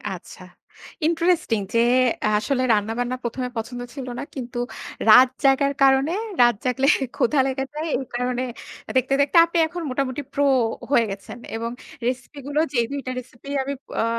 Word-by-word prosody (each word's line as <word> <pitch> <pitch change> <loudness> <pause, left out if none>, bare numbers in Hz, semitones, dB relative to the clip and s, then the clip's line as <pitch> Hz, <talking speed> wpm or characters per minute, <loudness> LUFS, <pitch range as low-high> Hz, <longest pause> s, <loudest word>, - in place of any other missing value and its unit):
আচ্ছা। - - -12 0.6
ইন্টারেস্টিং 335 - +1
যে 230 - +3 0.6
আসলে 255 +4 0
রান্না-বান্না 225 +4 -1
প্রথমে 250 +2 -3
পছন্দ 245 +2 -4
ছিল 265 -3 -7
না - - -3
কিন্তু 245 -2 -5 0.5
রাত 250 +3 +9
জাগার 275 +1 +4
কারণে 270 +4 +4 0.3
রাত 240 -2 +5
জাগলে 260 +2 +1 0.3
ক্ষুধা 285 +4 +2
লেগে 270 0 -2
যায়। 310 +2 -3
এই 265 - -5
কারণে 250 +1 -1 0.5
দেখতে, 260 +1 +1
দেখতে 285 +4 +2
আপনি 335 +1 -3
এখন 345 +1 -6
মোটামুটি 260 +1 -2
প্রো 285 0 +2 0.5
হয়ে 235 -5 +4
গেছেন 195 +4 -8 0.2
এবং 230 +1 -3 0.4
রেসিপি 255 +3 -4
গুলো 290 +1 0
যে 240 - +2
দুইটা 275 -2 -4
রেসিপি 255 +2 -13
আমি 280 +1 -3 0.3
আ - - +2
255 Hz, 150 wpm, -23 LUFS, 245-280 Hz, 0.6 s, রাত